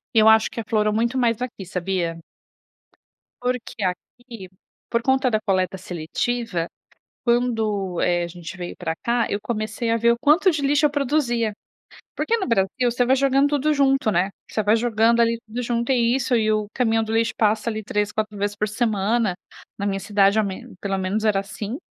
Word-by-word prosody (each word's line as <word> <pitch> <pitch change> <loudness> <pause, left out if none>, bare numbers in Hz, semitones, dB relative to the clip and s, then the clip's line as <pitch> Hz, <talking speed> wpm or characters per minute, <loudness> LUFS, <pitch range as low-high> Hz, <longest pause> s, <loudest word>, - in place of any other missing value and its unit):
Eu 220 0 +7
acho 220 0 +5
que 230 - -5
aflorou 215 -1 0
muito 235 +4 0
mais 235 -2 +1
aqui, 240 -6 -5
sabia? 180 -2 -2 1.2
Porque 245 -4 -3
aqui, 195 +3 -6 0.4
por 235 - +1
conta 265 +1 +2
da 215 -2 +1
coleta 190 -2 0
seletiva, 180 +2 -3 0.6
quando, 220 -7 0
eh, 175 -1 +1
a - - -3
gente 170 +1 -9
veio 175 -1 -6
pra 160 -2 -3
cá, 235 +3 0
eu 205 - 0
comecei 220 +1 -3
a 230 - +3
ver 235 +1 +4
o - - -1
quanto 310 +8 +4
de 305 -4 -2
lixo 290 +2 +3
eu - - 0
produzia. 255 -6 0 0.6
Porque 465 - +1
no 380 - -2
Brasil 195 -6 +2 0.2
você 245 +1 +1
vai 260 +2 +3
jogando 275 +1 +3
tudo 295 +1 +1
junto, 270 -5 +2
né, 185 +1 +1 0.2
você 215 - -1
vai 210 +2 +3
jogando 230 0 +2
ali 230 0 +2
tudo 230 +3 -5
junto, 235 +1 -1
e 240 -1 +3
isso, 260 -1 0
e 215 -1 +2
o 215 -1 -1
caminhão 225 -3 +1
do 220 - -5
lixo 230 0 +1
passa 215 +1 +1
ali 220 -1 -3
3, 210 +1 -1
4 215 -1 -3
vezes 205 0 -2
por 210 +1 -1
semana, 220 -1 0 0.4
na 200 - -3
minha 195 -1 -1
cidade, 200 +1 +3
ao 215 - +3
menos 195 -2 -7
pelo 195 -1 -2
menos 195 +4 -1
era 210 -3 +3
assim. 205 +3 -6
220 Hz, 190 wpm, -23 LUFS, 200-245 Hz, 1.2 s, Eu